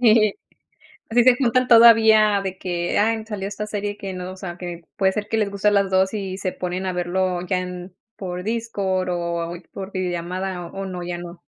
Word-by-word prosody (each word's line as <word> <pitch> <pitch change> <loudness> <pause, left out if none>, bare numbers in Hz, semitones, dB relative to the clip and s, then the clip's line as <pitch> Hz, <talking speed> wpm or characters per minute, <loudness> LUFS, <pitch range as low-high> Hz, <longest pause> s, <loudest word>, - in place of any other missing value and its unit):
Sí, 215 -3 +5 0.8
así 235 +1 +4
se 255 -1 +6
juntan 255 0 +2
todavía 220 -3 +7
de 190 -1 -4
que, 175 -2 -2
ay 220 +1 +1
salió 205 -3 -4
esta 210 +1 -5
serie 205 0 -3
que 195 -1 -6
no, 185 0 -6
o 190 - -10
sea, 175 -2 -7
que 175 -2 -7
puede 190 -1 +2
ser 210 +1 -3
que 225 - -1
les 210 -2 +1
guste 200 +1 -1
a - - -1
las 200 -1 +2
2, 190 +1 +2
y 195 -3 -4
se 185 -2 -2
ponen 180 +1 -4
a 185 - -1
verlo 180 0 -1
ya 185 0 +1
en 180 0 -7 0.2
por 180 -2 -5
Discord 200 -5 -1
o 170 -1 -2 0.2
por 195 0 -7
videollamada, 180 0 -3
¿o 195 +3 -6
no, 180 -2 -5
ya 175 0 -4
no? 175 0 -9
190 Hz, 210 wpm, -22 LUFS, 180-210 Hz, 0.8 s, todavía